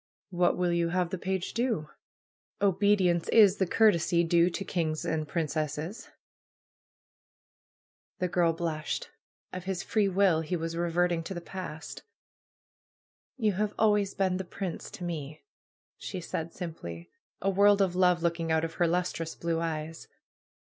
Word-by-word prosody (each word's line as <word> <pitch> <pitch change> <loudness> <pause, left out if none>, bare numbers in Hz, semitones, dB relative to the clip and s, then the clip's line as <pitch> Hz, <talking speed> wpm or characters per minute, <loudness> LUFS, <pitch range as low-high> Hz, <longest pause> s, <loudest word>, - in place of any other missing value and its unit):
'^What 175 0 +2
will 180 -1 +1
you 170 -1 +1
have 180 0 0
the 190 - -3
page 190 0 -2
do? 230 -10 -1 0.7
^Obedience 195 -3 +2
is 205 -3 +6
the 190 - +1
courtesy 170 -5 +3
due 170 +1 +4
to 195 +3 -5
kings' 160 -4 -2
and 155 -1 -1
princesses 155 +3 -3 1.4
!" - - -81
The 180 - 0
girl 175 -1 +2
blushed. 165 -2 -3 0.4
Of 185 0 -6
his 190 -1 -2
free 210 -3 +1
will 190 -4 +3
he 160 +3 -2
was 165 0 -3
reverting 175 0 +1
to 190 - -5
the - - -3
past. 170 -3 -7 1.4
^^You 210 -5 +1
have 210 0 -1
always 210 -2 +2
been 185 -2 +1
The 190 - -3
prince' 180 -1 -5
to 205 -4 -9
me," 155 -4 -5 0.6
she 185 - -5
said 165 -1 -4
simply, 85 - -7 0.3
a 195 - +1
world 200 +1 +5
of 190 -3 +2
love 180 -2 +3
looking 165 -1 0
out 160 0 +2
of 165 - -6
her 175 - +5
lustrous 170 -1 -1
blue 170 -1 -1
eyes. 160 -1 -4
175 Hz, 150 wpm, -29 LUFS, 165-190 Hz, 1.4 s, is